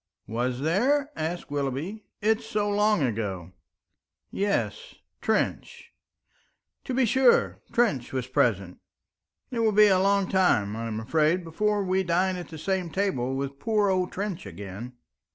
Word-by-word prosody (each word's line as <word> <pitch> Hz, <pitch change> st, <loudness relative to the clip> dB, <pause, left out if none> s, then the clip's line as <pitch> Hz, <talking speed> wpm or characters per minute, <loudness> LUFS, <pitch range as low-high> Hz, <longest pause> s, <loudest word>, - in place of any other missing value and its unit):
"Was 125 Hz, +3 st, -2 dB
there?" 265 Hz, -, +1 dB
asked 160 Hz, -1 st, -4 dB
Willoughby. 145 Hz, +9 st, -3 dB, 0.2 s
"It's 220 Hz, +2 st, +2 dB
so 210 Hz, -1 st, 0 dB
long 210 Hz, -3 st, +2 dB
ago." 100 Hz, -7 st, -3 dB, 0.8 s
"Yes 205 Hz, -, -2 dB, 0.3 s
Trench." -, -, -2 dB, 0.9 s
"To 255 Hz, -, -3 dB
be 260 Hz, -1 st, +3 dB
sure, 255 Hz, +2 st, +3 dB
Trench 215 Hz, -, +1 dB
was 130 Hz, -2 st, -2 dB
present. 100 Hz, -8 st, 0 dB, 0.7 s
It 240 Hz, -, -2 dB
will 225 Hz, -1 st, +3 dB
be 210 Hz, +1 st, +6 dB
a 190 Hz, -1 st, +4 dB
long 200 Hz, 0 st, +2 dB
time, 110 Hz, -, +2 dB
I 115 Hz, +1 st, -4 dB
am 110 Hz, -1 st, -3 dB
afraid, 155 Hz, +9 st, +1 dB
before 205 Hz, +5 st, 0 dB
we 190 Hz, 0 st, +1 dB
dine 185 Hz, +1 st, +1 dB
at 175 Hz, -1 st, -6 dB
the 160 Hz, -, -9 dB
same 185 Hz, +1 st, -1 dB
table 135 Hz, -10 st, -1 dB
with 140 Hz, 0 st, -4 dB
poor 210 Hz, +1 st, +2 dB
old 185 Hz, -1 st, 0 dB
Trench 195 Hz, -3 st, -4 dB
again." 100 Hz, +5 st, -8 dB
180 Hz, 145 wpm, -26 LUFS, 130-210 Hz, 0.9 s, be